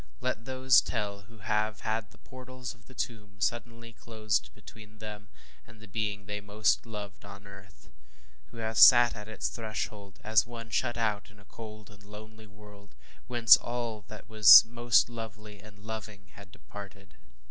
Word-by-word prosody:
Let 115 - -3
those 130 -1 +4
tell 100 -3 -4
who 115 - -17
have 105 +1 -2
had 110 0 -3
the - - -21
portals 130 -1 -10
of 115 -1 -24
the 130 - -16
tomb 105 -4 -6
suddenly 115 +1 -4
closed 110 -3 -3
between 110 0 -15
them 105 -1 -10 0.4
and 115 -2 -17
the 110 - -14
being 105 0 -4
they 105 +1 -5
most 105 +3 0
loved 105 -3 -9
on 100 0 -12
earth 95 -2 -15 0.6
who - - -16
have 110 -1 -3
sat 120 -1 +8
at 105 -1 -9
its 110 - -4
threshold, 110 -3 -6
as 110 +1 +2
one 115 -1 -10
shut 120 +1 -1
out 105 -3 -2
in 105 - -21
a 100 - -20
cold 110 -2 -12
and 100 -1 -18
lonely 110 +1 -13
world, 100 -1 -17 0.3
whence 120 -2 +7
all 120 -3 -5
that 110 +1 -12
was 110 -1 +9
most 120 0 +2
lovely 110 -3 -10
and 105 0 -16
loving 105 -3 -8
had 100 -2 -15
departed. 100 -2 -13
110 Hz, 170 wpm, -29 LUFS, 105-115 Hz, 0.6 s, was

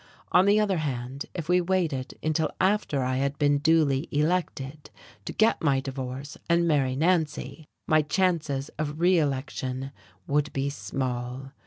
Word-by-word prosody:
On 185 +2 +5
the 205 +1 +5
other 200 -5 +1
hand, 135 -2 -4
if 165 -4 -4
we 180 +1 +4
waited 170 -8 -1
until 155 0 +1
after 190 -8 +1
I 130 0 0
had 140 +1 -1
been 145 -1 +3
duly 150 -3 +3
elected 150 -2 -1 0.4
to - - -4
get 220 +1 +2
my 140 -4 +3
divorce 135 +1 -6
and 170 0 +3
marry 135 -5 +2
Nancy 160 -1 0 0.2
my 155 0 +5
chances 155 -4 0
of 150 0 -3
reelection 135 -6 0 0.3
would 145 +1 0
be 140 +1 -1
small. 125 +2 -4
145 Hz, 145 wpm, -27 LUFS, 135-165 Hz, 0.4 s, On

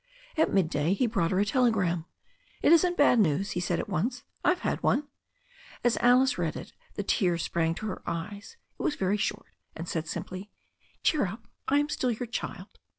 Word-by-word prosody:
At 320 - +2
midday 160 -2 +2
he 250 - +2
brought 215 -8 +1
her 185 - +1
a 205 - +3
telegram. 195 -8 +2 0.6
"It - - +5
isn't 350 +1 +5
bad 285 -4 +5
news," 195 0 +2
he 175 - -1
said 175 -1 0
at - - -3
once. 235 - -1 0.2
"I've 360 0 +2
had - - -1
one." 290 +1 +2 0.8
As 240 -1 +3
Alice 250 -1 +4
read 165 -3 -1
it - - -8 0.2
the 205 - -2
tears 175 -4 +1
sprang 165 -1 0
to 215 - -6
her 210 - -4
eyes. 200 - -5 0.2
It - - -4
was 295 - 0
very 195 +2 +1
short, 210 - -3 0.2
and 165 +2 -6
said 160 -1 -2
simply: 185 +5 -5 0.5
"Cheer 295 -10 +3
up 220 +4 -8 0.2
I 280 - +3
am 290 0 +2
still 255 -3 0
your 240 +1 -2
child." 240 - -6
205 Hz, 195 wpm, -28 LUFS, 175-250 Hz, 0.8 s, It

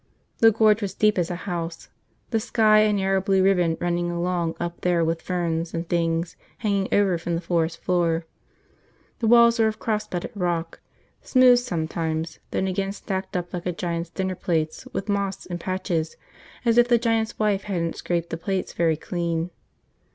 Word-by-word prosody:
The 225 - +8
Gorge 215 0 +3
was 195 -2 -3
deep 210 -2 +3
as 170 - 0
a 175 - -2
house, 170 -3 -4 0.4
the 225 - +2
sky 215 -1 +4
a 215 0 +4
narrow 195 -1 +1
blue 190 0 +2
ribbon 180 -4 +3
running 175 0 -1
along 175 -1 -1
up 170 0 -4
there 175 -2 +2
with 165 0 -1
ferns 170 -2 -2
and 165 +1 -3
things 165 0 0 0.2
hanging 200 -4 0
over 195 -4 +3
from 170 0 -2
the - - -1
forest 165 -1 -1
floor. 170 -2 +1 0.9
The 230 - 0
walls 235 0 +6
were 220 - +5
of 215 0 -2
cross 215 -1 -2
bedded 175 -4 -4
rock, 175 -4 -2 0.4
smooth 255 -2 +5
sometimes, 160 -6 -3
then - - -1
again 195 +1 -1
stacked 190 -2 -4
up 175 +1 -5
like 175 0 -4
a - - +1
giant's 170 -1 -3
dinner 190 +1 -2
plates 160 -3 -2
with 195 - -4
moss 200 -1 -2
in 175 -1 -5
patches 175 -3 -2 0.5
as 235 0 +4
if 240 - +5
the 240 -1 +5
giant's 225 -1 0
wife 205 -2 +1
hadn't 170 -5 -2
scraped 170 -1 -2
the 165 - -2
plates 190 +2 -3
very 165 -2 +1
clean. 170 0 -2
180 Hz, 180 wpm, -24 LUFS, 170-205 Hz, 0.9 s, The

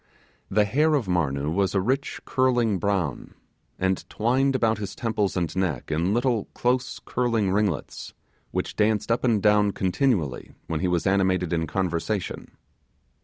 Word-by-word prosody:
The 105 +1 +3
hair 150 +9 +2
of 135 -6 0
Marnoo 75 -5 0
was 95 +3 0
a - - +4
rich 130 +8 -1
curling 120 -6 +2
brown, 95 -8 -2 0.4
and 95 0 0
twined 130 +5 +1
about 115 -4 +1
his 100 -2 -5
temples 105 -5 -1
and 85 -2 -2
neck 85 -8 -2
in 85 +5 +1
little 120 -1 +1
close 125 +1 0
curling 115 -6 0
ringlets, 100 -6 -2 0.3
which - - -3
danced 110 +1 +1
up 115 - +1
and 115 -6 +2
down 105 -1 +4
continually, 95 - 0
when 80 - -2
he 95 - 0
was 90 -3 0
animated 95 -2 +2
in 80 -1 0
conversation. 95 +3 -3
100 Hz, 150 wpm, -25 LUFS, 90-115 Hz, 0.4 s, a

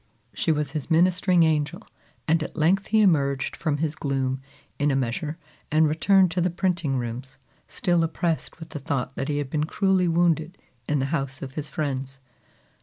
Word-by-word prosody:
She - - 0
was 150 -2 -1
his 150 0 -4
ministering 180 +1 +4
angel, 150 -2 0 0.4
and 165 +1 +3
at 155 - -6
length 185 +6 +2
he 220 0 +3
emerged 140 -8 +2
from 155 -3 -1
his 155 0 -1
gloom 135 -3 -2 0.4
in 145 +1 +2
a 135 - +1
measure 135 +5 -2 0.3
and 155 +1 +4
returned 185 +4 +4
to 180 +1 0
the 180 - +2
printing 170 -6 0
rooms, 125 +3 -5 0.3
still 175 -2 +1
oppressed 165 0 -2
with 160 -1 -9
the 150 - -6
thought 135 -3 -2
that 135 - -3
he 145 - 0
had 145 -2 -3
been 150 -1 0
cruelly 190 +1 +2
wounded 170 0 +1 0.3
in 150 - +2
the 135 - 0
house 135 -3 -2
of 130 -1 -7
his 150 0 -5
friends. 135 -2 -3
155 Hz, 185 wpm, -25 LUFS, 140-170 Hz, 0.4 s, ministering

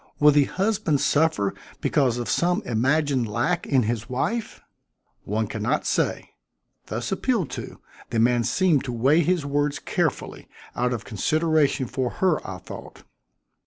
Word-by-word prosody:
Will 150 0 +7
the 145 -1 +4
husband 190 -6 0
suffer 145 -12 +2 0.3
because 130 -5 +1
of 120 - -3
some 180 +5 +1
imagined 130 0 +1
lack 120 +12 -1
in 130 -3 +3
his 115 +1 -3
wife?" 215 - -2 0.7
"One - - -1
can - - -6
not - - 0
say." - - -1 0.6
Thus - - -4
appealed 225 - 0
to, - - -7 0.3
the 115 - -2
man 120 +1 +3
seemed 170 0 +2
to 125 - -4
weigh 135 +7 +3
his 175 -2 +1
words 145 0 0
carefully, - - -2 0.3
out 125 +1 0
of 120 -2 -4
consideration 155 - +1
for 125 +1 -2
her, 185 -5 +2
I 95 - -5
thought. - - -11
140 Hz, 150 wpm, -24 LUFS, 120-160 Hz, 0.7 s, Will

